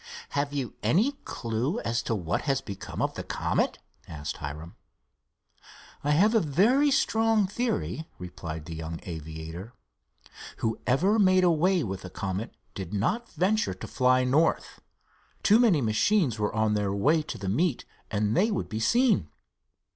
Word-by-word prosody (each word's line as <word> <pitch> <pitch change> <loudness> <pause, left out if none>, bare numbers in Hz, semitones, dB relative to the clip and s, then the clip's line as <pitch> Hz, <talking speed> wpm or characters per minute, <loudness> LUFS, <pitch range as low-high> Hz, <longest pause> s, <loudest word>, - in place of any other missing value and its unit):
"Have 145 0 -1
you 135 -5 -3
any 185 - +3
clue 120 - -2
as 115 +1 -1
to 115 - -1
what 85 -5 -1
has 135 -1 +2
become 100 -7 -5
of - - -1
the - - -5
Comet?" - - -1 0.3
asked 75 -1 -5
Hiram. 75 +4 -7 1.3
"I 145 - -1
have 190 +10 +4
a 225 - +5
very 215 - +3
strong 225 -5 +2
theory," 205 -6 -2
replied 80 -3 -7
the 85 - -7
young 80 +1 -5
aviator. 80 +5 -7 0.8
"Whoever 135 - +1
made 185 -2 +5
away 175 +1 +3
with 95 -4 -4
the 95 - -8
Comet 100 +4 -4 0.2
did 95 +1 -5
not 215 - -1
venture 195 - +1
to - - -8
fly 130 0 +3
north—too 160 - 0
many 210 - +4
machines 120 - +2
were 105 - 0
on 110 -1 +2
their 105 -2 0
way 150 +10 +3
to 150 - -6
the 100 -3 -6
meet, 135 - 0 0.2
and 105 +1 0
they 215 - +3
would 205 - -2
be 110 - -3
seen. 225 - +3
125 Hz, 150 wpm, -27 LUFS, -, 1.3 s, a